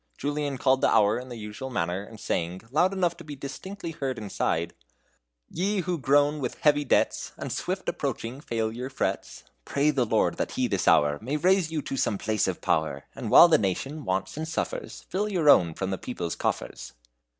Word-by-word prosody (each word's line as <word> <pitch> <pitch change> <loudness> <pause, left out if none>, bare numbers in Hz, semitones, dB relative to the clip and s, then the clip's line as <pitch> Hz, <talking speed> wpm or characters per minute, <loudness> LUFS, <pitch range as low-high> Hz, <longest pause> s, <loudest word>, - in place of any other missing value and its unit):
Julian 145 -1 -2
called 130 +1 +2
the - - +4
hour 105 +2 +4
in 130 +1 -9
the 120 - -7
usual 105 +5 -7
manner, 90 -5 -1
and 110 +2 -12
sang, 85 0 -2
loud 175 +7 +3
enough 180 -3 0
to - - -10
be 150 -2 -8
distinctly 170 +6 -7
heard 135 -5 -3
inside: 85 -5 -2 0.7
"Ye 195 +3 -1
who 180 -1 -2
groan 145 +2 +3
with 125 -4 -3
heavy 145 -1 +4
debts, 135 - +1
And - - -5
swift - - -3
approaching 125 +5 -3
failure 115 +1 -3
frets, 135 - -3 0.2
Pray 145 - +1
the 135 -4 +1
Lord - - +1
that - - -2
He - - +1
this - - -1
hour 75 0 +4
May 135 +7 -2
raise 185 +1 +3
you 155 -3 -2
to 135 - -4
some 105 -4 +1
place 110 0 0
of - - -3
power; 80 -3 0
And - - -5
while 175 - +9
the 165 - +4
nation 135 - -2
wants 95 +8 -2
and 160 +1 -3
suffers, - - -4
Fill 205 +3 -1
your 165 -6 +5
own 85 - +4
from 95 0 -3
the 95 - -3
people's 90 -9 -4
coffers." - - -3
135 Hz, 195 wpm, -27 LUFS, 105-155 Hz, 0.7 s, while